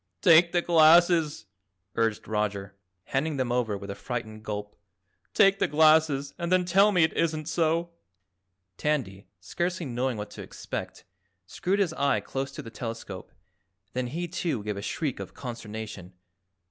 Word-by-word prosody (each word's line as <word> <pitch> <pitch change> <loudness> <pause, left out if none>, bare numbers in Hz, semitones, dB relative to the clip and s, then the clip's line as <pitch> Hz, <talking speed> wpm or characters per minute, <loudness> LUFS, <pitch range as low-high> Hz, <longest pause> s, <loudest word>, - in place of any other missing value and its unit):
"Take 170 +1 +7
the 175 -1 +1
glasses," 165 -3 +5 0.5
urged 115 -2 -1
Roger, 105 -2 -2 0.3
handing 145 +6 -1
them 130 -2 -1
over 120 -4 0
with 100 0 -7
a - - -3
frightened 110 -1 -6
gulp. 105 -1 -5 0.6
"Take 195 0 +5
the - - +2
glasses 155 -2 +3
and 170 0 -3
then 185 -1 +3
tell 195 +4 +5
me 180 -4 +4
it 160 - +2
isn't 155 -2 -1
so." 165 +1 0 0.9
Tandy, 115 -10 -2
scarcely 175 - -3
knowing 125 -1 -2
what 105 0 -6
to - - -9
expect, - - -7 0.4
screwed 185 - -1
his 190 -5 +1
eye 140 -3 +1
close 135 0 -4
to - - -7
the 115 - -10
telescope, 115 -4 -7 0.6
then 125 0 -2
he, 170 +7 -4
too, 165 - -2
gave 105 -1 -3
a 100 - -5
shriek 140 +5 -3
of - - -8
consternation. 110 -6 -7
140 Hz, 155 wpm, -27 LUFS, 110-165 Hz, 0.9 s, Take